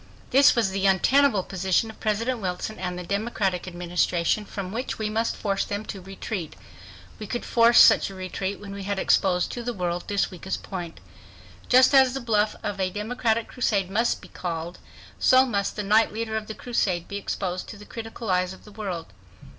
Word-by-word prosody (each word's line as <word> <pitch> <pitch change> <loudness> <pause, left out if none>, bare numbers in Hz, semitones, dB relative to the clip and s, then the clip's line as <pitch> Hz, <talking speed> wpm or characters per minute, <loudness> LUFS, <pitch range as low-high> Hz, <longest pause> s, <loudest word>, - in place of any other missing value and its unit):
This 275 +2 +6
was 225 -5 +1
the 195 0 +1
untenable 210 +3 +4
position 190 +4 0
of - - -19
President 230 +4 -1
Wilson 185 +2 -4
and 180 -1 -3
the 180 - -5
Democratic 200 -2 -1
Administration, 175 +2 0
from 195 -2 -6
which 240 +5 -3
we 215 -1 -2
must 225 +1 0
force 195 -2 0
them 205 +1 -4
to 195 - -7
retreat. 190 -1 -6 0.6
We 215 - -6
could 240 - -4
force 235 0 +5
such - - +7
a 195 - -10
retreat 190 +1 -4
when 200 -1 -8
we 200 - -6
had 200 +1 -2
exposed 180 -2 +2
to 245 - -5
the 240 0 -4
world 175 -1 -2
this 200 -1 0
weakest 185 +1 -5
point. 175 -4 -6 0.7
Just 255 +2 +6
as 265 -1 +6
the - - -2
bluff 215 -3 +1
of 205 -1 -3
a 185 -1 +1
democratic 220 +3 -1
crusade 200 -7 0
must 230 +4 0
be - - -11
called, 170 0 -5 0.4
so 260 0 +6
must 200 -5 -1
the 210 - -3
knight 215 +3 +4
leader 220 0 -3
of 215 -1 -3
the 220 - -6
crusade 185 -8 -1
be 200 - -4
exposed 185 -2 -3
to 215 - -8
the 210 - -12
critical 225 -2 -6
eyes 185 0 +1
of - - -15
the 210 - -14
world. 185 - -6
200 Hz, 195 wpm, -25 LUFS, 185-225 Hz, 0.7 s, such